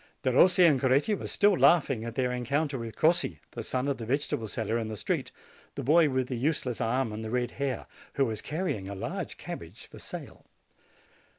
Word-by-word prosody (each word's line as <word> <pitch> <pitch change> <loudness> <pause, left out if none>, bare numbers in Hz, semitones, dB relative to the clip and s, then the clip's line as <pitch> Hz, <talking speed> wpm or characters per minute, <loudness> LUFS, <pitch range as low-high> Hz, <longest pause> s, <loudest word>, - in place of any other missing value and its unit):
Derossi 175 +8 +5
and 140 -5 +3
Coretti 140 +10 +3
were 200 - -3
still 205 -1 +3
laughing 140 -10 +4
at 115 0 -6
their 125 -2 +1
encounter 135 +3 -1
with 115 -2 -6
Crossi, 170 +2 +2
the - - -6
son 130 +1 -2
of 140 - 0
the 115 - -5
vegetable 130 -4 -1
seller, 110 +2 -2
in 110 - -3
the 110 -1 -5
street, - - -2 0.4
the - - -4
boy 155 +3 +5
with 130 -1 0
the 125 - -3
useless 125 -2 -1
arm 115 0 0
and 110 +1 -5
the 110 - -4
red 125 +1 -1
hair, 135 -3 -3 0.3
who 135 - +2
was 110 -3 -3
carrying 150 - -3
a 100 - -5
large 95 - -5
cabbage - - -8
for - - -13
sale. - - -9
130 Hz, 200 wpm, -29 LUFS, 115-145 Hz, 0.4 s, Derossi